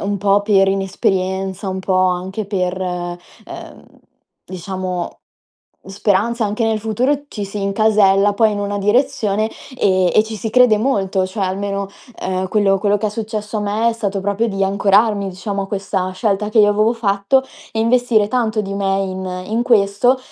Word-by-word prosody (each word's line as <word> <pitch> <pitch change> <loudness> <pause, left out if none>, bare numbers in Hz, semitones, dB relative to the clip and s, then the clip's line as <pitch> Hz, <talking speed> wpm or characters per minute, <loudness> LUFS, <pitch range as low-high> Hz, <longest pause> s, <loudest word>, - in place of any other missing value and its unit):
un 200 0 -2
po' 200 +1 +2
per 195 -2 +3
inesperienza, 190 0 -1
un 190 0 -3
po' 185 0 0
anche 185 +4 -2
per, 185 -2 -2
ehm, 175 -1 -7 0.6
diciamo, 185 -1 -4 0.8
speranza 205 +4 0
anche 210 +3 -2
nel 220 -1 +1
futuro 250 +7 0
ci 210 - -6
si 200 0 -5
incasella 200 -1 +3
poi 220 0 +3
in 205 - -3
una 205 0 -2
direzione, 215 -1 +1 0.3
ehm, 185 -2 +2
e 215 - +6
ci 220 0 -6
si 220 +2 -4
crede 250 -2 +5
molto, 195 -6 0
cioè 195 +1 -3
almeno, 200 +1 -3 0.3
ehm, 185 0 -2
quello 200 -2 +2
quello 205 +1 +1
che 215 - -1
è - - -2
successo 215 0 -4
a - - -2
me 210 +3 0
è - - -2
stato 200 -3 -2
proprio 205 +4 0
di 195 -1 -2
ancorarmi, 200 +1 +2
diciamo, 195 +2 -4
a - - -5
questa 195 -2 -2
scelta 210 +1 -1
che 220 - +1
io 205 - +5
avevo 215 +3 +2
fatto 210 +3 +1 0.3
e 220 - -3
investire 230 -2 +2
tanto 225 -3 0
di 195 0 -5
me 195 -1 0
in 185 -1 -5
in 230 +2 0
questo. 230 +2 +3
200 Hz, 170 wpm, -18 LUFS, 190-215 Hz, 0.8 s, e